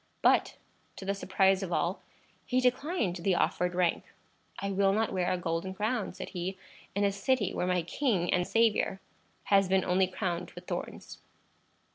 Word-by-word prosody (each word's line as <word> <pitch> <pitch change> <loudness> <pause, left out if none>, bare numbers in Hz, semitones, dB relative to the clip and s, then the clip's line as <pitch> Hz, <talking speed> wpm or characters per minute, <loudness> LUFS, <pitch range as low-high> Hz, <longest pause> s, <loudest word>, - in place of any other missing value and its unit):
But, - - +3 0.4
to 190 - -8
the 200 - 0
surprise 190 0 +2
of 190 -2 -4
all, 175 +3 0 0.5
he 255 - +2
declined 255 - 0
the 180 +1 +1
offered 180 0 0
rank. 180 -2 +1 0.5
"I 200 0 -3
will 195 0 +3
not 220 +1 0
wear 180 -2 0
a 185 - +1
golden 170 +2 -3
crown," 215 +2 -1
said - - -6
he, 185 +1 -4 0.4
"in 200 - +1
a 200 - +3
city 205 +1 0
where 180 - -1
my 180 -2 +1
king 185 - 0
and 180 0 +1
Saviour 225 -4 +2 0.5
has 195 -1 +5
been 190 -1 +3
only 185 +1 +3
crowned 180 -2 -3
with 175 0 -10
thorns." - - -6
190 Hz, 170 wpm, -30 LUFS, 180-205 Hz, 0.5 s, has